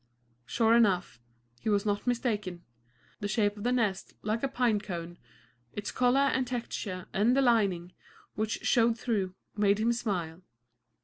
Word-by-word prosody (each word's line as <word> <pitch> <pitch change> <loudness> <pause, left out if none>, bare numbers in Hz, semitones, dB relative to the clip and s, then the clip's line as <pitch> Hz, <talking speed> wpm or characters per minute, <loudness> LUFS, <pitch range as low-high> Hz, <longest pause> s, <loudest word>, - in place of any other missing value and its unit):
Sure 225 - +3
enough, 190 - +2 0.4
he 220 - -2
was 205 -1 +2
not 205 +2 -1
mistaken. 210 -8 -1 0.6
The 205 - -2
shape 205 -1 +1
of 205 - -8
the 245 - +1
nest, 220 -6 -1
like 215 +2 -1
a 275 - +1
pine 245 -5 +1
cone, 175 -3 -6 0.5
its 205 0 -4
color 250 +2 +3
and 260 -2 +1
texture, 215 -6 -4
and 230 +6 +3
the - - +5
lining, 195 -8 +2 0.4
which 215 +1 -2
showed 235 -2 +3
through, 200 -6 -1 0.2
made 205 -1 +3
him 230 +2 +2
smile. 185 -8 -3
215 Hz, 150 wpm, -29 LUFS, 190-235 Hz, 0.6 s, the